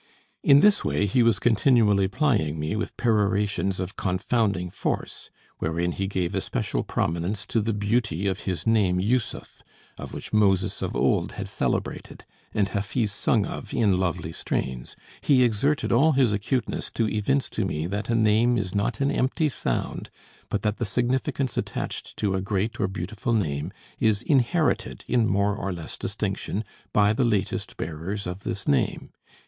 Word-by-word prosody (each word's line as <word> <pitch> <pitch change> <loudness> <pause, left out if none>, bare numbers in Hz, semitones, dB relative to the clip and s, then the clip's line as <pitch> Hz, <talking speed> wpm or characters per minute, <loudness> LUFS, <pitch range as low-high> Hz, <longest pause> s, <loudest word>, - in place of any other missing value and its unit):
In 140 0 +6
this 210 +2 +5
way 100 - +1
he 105 +5 +2
was 115 -1 +4
continually 110 -4 +3
plying 95 - +1
me 75 +7 -2
with 110 - -4
perorations 100 -4 +1
of 95 0 -5
confounding 95 -1 0
force, - - -3 0.3
wherein 85 +2 -1
he 95 +2 -2
gave 95 -3 -1
especial - - -1
prominence 90 +5 -2
to 115 - 0
the 115 +2 0
beauty 105 -3 0
of 95 0 0
his 95 -4 -3
name 105 -5 +3
Jussuf, 115 +5 -2 0.5
which - - -8
Moses 95 -3 +2
of - - -3
old - - +1
had - - -5
celebrated, - - -3 0.3
and 100 -2 +1
Hafiz 105 +2 -1
sung 105 0 +1
of - - -6
in 100 -5 +3
lovely 85 -3 -1
strains; 65 -5 -3 0.3
he 130 -3 +4
exerted 125 +6 +1
all 145 +7 +5
his 130 -5 +3
acuteness 115 +5 -1
to 115 - +1
evince 130 +7 0
to 110 - -1
me 80 -5 -2
that 100 +5 -3
a 115 - +2
name 115 +2 +4
is 95 -4 -2
not 105 +4 -1
an 140 +1 +2
empty 145 +4 +1
sound, - - -3 0.4
but 105 - -2
that 105 0 0
the 120 - -1
significance 125 +3 -1
attached - - -4
to 100 -2 0
a 95 - 0
great 105 +4 -2
or 100 - +2
beautiful 100 +5 -3
name 75 -10 -1 0.3
is 110 -2 +2
inherited 145 +4 +1
in 120 -3 +2
more 100 +1 +1
or 100 -2 -3
less 85 -3 -6
distinction 105 - -3 0.3
by 105 0 +4
the 130 - +1
latest 105 -6 -1
bearers 85 +6 -4
of 90 +1 -4
this 95 -1 -5
name. 70 - 0
105 Hz, 165 wpm, -25 LUFS, 95-115 Hz, 0.5 s, In